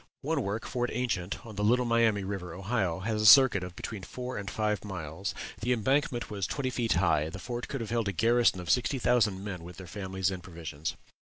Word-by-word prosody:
One 150 Hz, +1 st, 0 dB
work, 105 Hz, +1 st, -3 dB
Fort 125 Hz, -1 st, -1 dB
Ancient, 110 Hz, -7 st, -2 dB
on 110 Hz, -3 st, -10 dB
the 105 Hz, -, 0 dB
Little 125 Hz, +4 st, +3 dB
Miami 115 Hz, -4 st, +3 dB
River, 95 Hz, -3 st, -5 dB
Ohio, 95 Hz, -3 st, -1 dB
has 110 Hz, +1 st, -1 dB
a -, -, 0 dB
circuit 125 Hz, -6 st, +8 dB
of 90 Hz, -1 st, -7 dB
between 105 Hz, +1 st, -6 dB
four 125 Hz, +6 st, -6 dB
and 100 Hz, -1 st, -4 dB
five 105 Hz, -2 st, -1 dB
miles; 95 Hz, -1 st, -5 dB, 0.2 s
the 125 Hz, +3 st, +1 dB
embankment 125 Hz, 0 st, 0 dB
was 100 Hz, -3 st, -2 dB
twenty 130 Hz, -3 st, -2 dB
feet 120 Hz, -2 st, +1 dB
high; 80 Hz, -4 st, +2 dB
the 80 Hz, -, -7 dB
fort 120 Hz, +5 st, -5 dB
could 135 Hz, -, -4 dB
have 115 Hz, -1 st, -5 dB
held 115 Hz, -3 st, 0 dB
a -, -, +1 dB
garrison 115 Hz, +2 st, +3 dB
of 90 Hz, -, -1 dB
sixty 125 Hz, +2 st, +2 dB
thousand 110 Hz, -6 st, +2 dB
men 95 Hz, -4 st, -5 dB
with 90 Hz, +1 st, -10 dB
their 95 Hz, -, -8 dB
families 95 Hz, +1 st, -2 dB
and 95 Hz, -1 st, -5 dB
provisions. 80 Hz, -4 st, -5 dB
105 Hz, 220 wpm, -29 LUFS, 95-120 Hz, 0.2 s, circuit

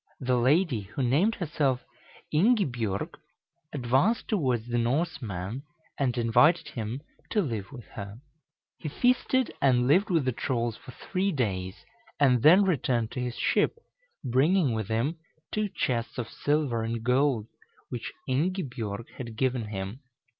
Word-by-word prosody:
The 125 Hz, -1 st, +1 dB
lady, 140 Hz, -, +3 dB
who 135 Hz, -, 0 dB
named 160 Hz, -, +3 dB
herself 145 Hz, -7 st, -1 dB, 0.5 s
Ingibjorg, 145 Hz, -, +1 dB, 0.5 s
advanced 135 Hz, -, +1 dB
towards 130 Hz, -, 0 dB
the 120 Hz, 0 st, 0 dB
Norseman, 120 Hz, -, -2 dB, 0.4 s
and 130 Hz, -3 st, +1 dB
invited 120 Hz, +8 st, +4 dB
him 115 Hz, +3 st, -4 dB, 0.3 s
to 215 Hz, -, +1 dB
live 110 Hz, -, -4 dB
with 120 Hz, -5 st, -10 dB
her. 100 Hz, +2 st, -7 dB, 0.6 s
He 155 Hz, -, -4 dB
feasted 255 Hz, -, +2 dB
and 125 Hz, -3 st, +4 dB
lived 185 Hz, +10 st, +4 dB
with 165 Hz, -7 st, +2 dB
the 130 Hz, -, +2 dB
trolls 120 Hz, -1 st, -1 dB
for -, -, -15 dB
three 190 Hz, +9 st, -2 dB
days, 95 Hz, -, -2 dB, 0.3 s
and 130 Hz, -4 st, +4 dB
then 175 Hz, -, +7 dB
returned 125 Hz, -, +1 dB
to -, -, -5 dB
his 125 Hz, -1 st, -3 dB
ship, -, -, +1 dB, 0.5 s
bringing 140 Hz, +3 st, +3 dB
with 110 Hz, -3 st, -2 dB
him 120 Hz, +9 st, -1 dB, 0.3 s
two 215 Hz, -1 st, 0 dB
chests 120 Hz, -9 st, -2 dB
of 120 Hz, -3 st, -3 dB
silver 145 Hz, -6 st, 0 dB
and 115 Hz, 0 st, -3 dB
gold, 125 Hz, -2 st, +2 dB, 0.4 s
which 120 Hz, -, -5 dB, 0.2 s
Ingibjorg 130 Hz, -, -2 dB
had 115 Hz, -4 st, -6 dB
given 130 Hz, -3 st, 0 dB
him. 100 Hz, +2 st, -5 dB
125 Hz, 140 wpm, -28 LUFS, 115-155 Hz, 0.6 s, then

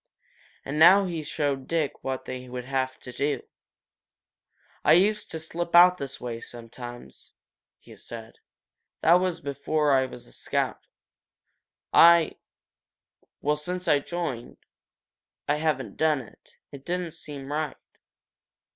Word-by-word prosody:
And 145 Hz, +3 st, -3 dB
now 190 Hz, +5 st, +8 dB
he 170 Hz, -3 st, -3 dB
showed 145 Hz, -3 st, -2 dB
Dick 160 Hz, -4 st, -2 dB
what 130 Hz, -1 st, -3 dB
they 130 Hz, 0 st, -7 dB
would 125 Hz, 0 st, -6 dB
have 130 Hz, -1 st, -2 dB
to 125 Hz, -, -9 dB
do. 140 Hz, +4 st, -1 dB, 1.4 s
"I 155 Hz, -, +6 dB
used 210 Hz, +5 st, +3 dB
to 160 Hz, -, -5 dB
slip 170 Hz, +2 st, -3 dB
out 180 Hz, +1 st, +8 dB
this 140 Hz, -1 st, -6 dB
way, 120 Hz, -2 st, -5 dB
sometimes," 120 Hz, -, -10 dB, 0.4 s
he -, -, -15 dB
said. 115 Hz, -1 st, -10 dB, 0.6 s
"That 170 Hz, +2 st, +6 dB
was 180 Hz, -2 st, -1 dB
before 145 Hz, +1 st, 0 dB
I 130 Hz, -1 st, +3 dB
was 125 Hz, -, -11 dB
a -, -, -17 dB
scout. -, -, -2 dB, 1.1 s
I 170 Hz, -1 st, +7 dB, 1.0 s
well, 150 Hz, +1 st, +1 dB
since 180 Hz, +4 st, -4 dB
I 145 Hz, -, +5 dB
joined, 145 Hz, -6 st, -5 dB, 0.9 s
I 145 Hz, -, +2 dB
haven't 135 Hz, -9 st, -2 dB
done 155 Hz, -3 st, +2 dB
it. 115 Hz, -, -18 dB, 0.2 s
It 140 Hz, -1 st, -10 dB
didn't 175 Hz, 0 st, -3 dB
seem 145 Hz, -2 st, -8 dB
right. 150 Hz, -1 st, -2 dB
145 Hz, 130 wpm, -26 LUFS, 130-165 Hz, 1.4 s, now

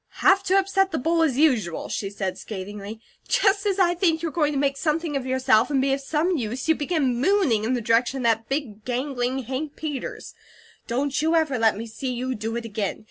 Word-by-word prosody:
"Have 385 Hz, 0 st, +6 dB
to 380 Hz, -, +3 dB
upset 390 Hz, 0 st, +2 dB
the 325 Hz, -, -2 dB
bowl, 330 Hz, +5 st, +1 dB
as 290 Hz, -6 st, +2 dB
usual?" 240 Hz, -, +2 dB
she 195 Hz, -, -3 dB
said, 195 Hz, -2 st, -3 dB
scathingly. 205 Hz, +1 st, -7 dB, 0.3 s
"Just 400 Hz, 0 st, +2 dB
as 395 Hz, -1 st, +1 dB
I 355 Hz, -3 st, +4 dB
think 335 Hz, -2 st, +1 dB
you're 330 Hz, -, -1 dB
going 300 Hz, -1 st, +1 dB
to 285 Hz, -, -2 dB
make 275 Hz, 0 st, +1 dB
something 310 Hz, +1 st, -1 dB
of 265 Hz, -2 st, -2 dB
yourself, 260 Hz, -3 st, +3 dB
and 280 Hz, -2 st, +1 dB
be 270 Hz, +1 st, +2 dB
of 275 Hz, -, -2 dB
some 315 Hz, +5 st, 0 dB
use, 245 Hz, +2 st, -4 dB
you 320 Hz, -, +5 dB
begin 290 Hz, -6 st, 0 dB
mooning 300 Hz, -, +2 dB
in 245 Hz, -, 0 dB
the 245 Hz, -, -1 dB
direction 230 Hz, +4 st, +2 dB
of 260 Hz, -, -4 dB
that 225 Hz, -1 st, +1 dB
big, 255 Hz, -7 st, -3 dB
gangling 255 Hz, +1 st, -2 dB
Hank 270 Hz, +5 st, -4 dB
Peters. 295 Hz, -4 st, -5 dB, 0.5 s
Don't 265 Hz, +3 st, -1 dB
you 320 Hz, +2 st, +2 dB
ever 305 Hz, -7 st, +1 dB
let 225 Hz, -2 st, +3 dB
me 225 Hz, -, -5 dB
see 250 Hz, +3 st, -5 dB
you 255 Hz, +1 st, -2 dB
do 225 Hz, 0 st, -4 dB
it 235 Hz, 0 st, -4 dB
again. 210 Hz, -3 st, -3 dB
270 Hz, 220 wpm, -24 LUFS, 230-320 Hz, 0.5 s, Have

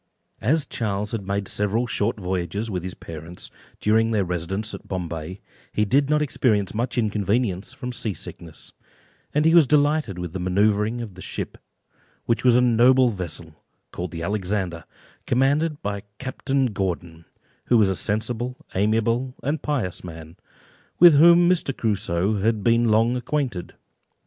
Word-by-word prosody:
As 150 Hz, +6 st, +2 dB
Charles 105 Hz, -2 st, -3 dB
had 100 Hz, -4 st, -4 dB
made 100 Hz, 0 st, -1 dB
several 105 Hz, +4 st, 0 dB
short 110 Hz, -2 st, -1 dB
voyages 95 Hz, +3 st, -3 dB
with 90 Hz, -2 st, -2 dB
his 90 Hz, +1 st, -6 dB
parents, 80 Hz, +2 st, -9 dB, 0.3 s
during 110 Hz, +1 st, +3 dB
their 105 Hz, -4 st, +1 dB
residence 90 Hz, +5 st, -3 dB
at -, -, -9 dB
Bombay, 85 Hz, -1 st, -5 dB, 0.3 s
he 105 Hz, -, +2 dB
did 140 Hz, +6 st, +2 dB
not 150 Hz, 0 st, +3 dB
experience 110 Hz, -8 st, +1 dB
much 120 Hz, +3 st, -2 dB
inconvenience 105 Hz, -2 st, 0 dB
from 130 Hz, -2 st, -6 dB
sea 110 Hz, -4 st, -2 dB
sickness; 80 Hz, -2 st, -10 dB, 0.6 s
and 150 Hz, +1 st, +1 dB
he 165 Hz, -, +5 dB
was 165 Hz, -5 st, +7 dB
delighted 145 Hz, -, +2 dB
with 90 Hz, -2 st, -5 dB
the 95 Hz, -, -4 dB
manoeuvring 105 Hz, +5 st, +1 dB
of 110 Hz, -5 st, -7 dB
the 90 Hz, -, -12 dB
ship, -, -, -5 dB, 0.7 s
which 115 Hz, -, 0 dB
was 125 Hz, -2 st, +5 dB
a 125 Hz, -, +5 dB
noble 125 Hz, +1 st, +5 dB
vessel, 85 Hz, -5 st, -5 dB, 0.4 s
called 90 Hz, +1 st, -5 dB
the 85 Hz, 0 st, -6 dB
Alexander, 95 Hz, -3 st, -2 dB, 0.4 s
commanded 145 Hz, +5 st, +1 dB
by 100 Hz, 0 st, -3 dB, 0.2 s
Captain 135 Hz, -1 st, -1 dB
Gordon, 85 Hz, -4 st, -4 dB, 0.4 s
who 120 Hz, -, +4 dB
was 105 Hz, -3 st, +5 dB
a 95 Hz, -, 0 dB
sensible, 120 Hz, +5 st, -2 dB, 0.2 s
amiable, 115 Hz, +5 st, +1 dB
and 150 Hz, +3 st, -1 dB
pious 130 Hz, -12 st, -2 dB
man, 80 Hz, -1 st, -10 dB, 0.6 s
with 175 Hz, -2 st, +9 dB
whom 170 Hz, +4 st, +7 dB
Mr. 170 Hz, -7 st, +1 dB
Crusoe 100 Hz, -2 st, 0 dB
had 110 Hz, -1 st, +1 dB
been 115 Hz, 0 st, +3 dB
long 115 Hz, +3 st, +3 dB
acquainted. 125 Hz, -6 st, -3 dB
110 Hz, 155 wpm, -23 LUFS, 95-125 Hz, 0.7 s, with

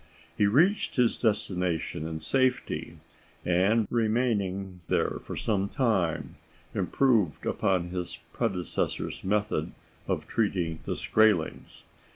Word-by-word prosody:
He 105 Hz, -, +3 dB
reached 175 Hz, -, +3 dB
his 125 Hz, -3 st, +3 dB
destination 90 Hz, -7 st, -1 dB
in 80 Hz, -1 st, -5 dB
safety, 130 Hz, -1 st, 0 dB, 0.5 s
and 95 Hz, +6 st, +3 dB
remaining 105 Hz, -6 st, 0 dB
there -, -, 0 dB
for -, -, -7 dB
some 100 Hz, -2 st, 0 dB
time, 105 Hz, -, 0 dB, 0.4 s
improved 115 Hz, -, +1 dB
upon 90 Hz, -2 st, +1 dB
his 90 Hz, -1 st, -4 dB, 0.2 s
predecessor's 90 Hz, -2 st, -2 dB
method 100 Hz, -4 st, 0 dB, 0.3 s
of -, -, -1 dB
treating 90 Hz, -7 st, -1 dB
the -, -, -2 dB
Skraelings. 110 Hz, -7 st, +1 dB
100 Hz, 105 wpm, -28 LUFS, 90-115 Hz, 0.5 s, He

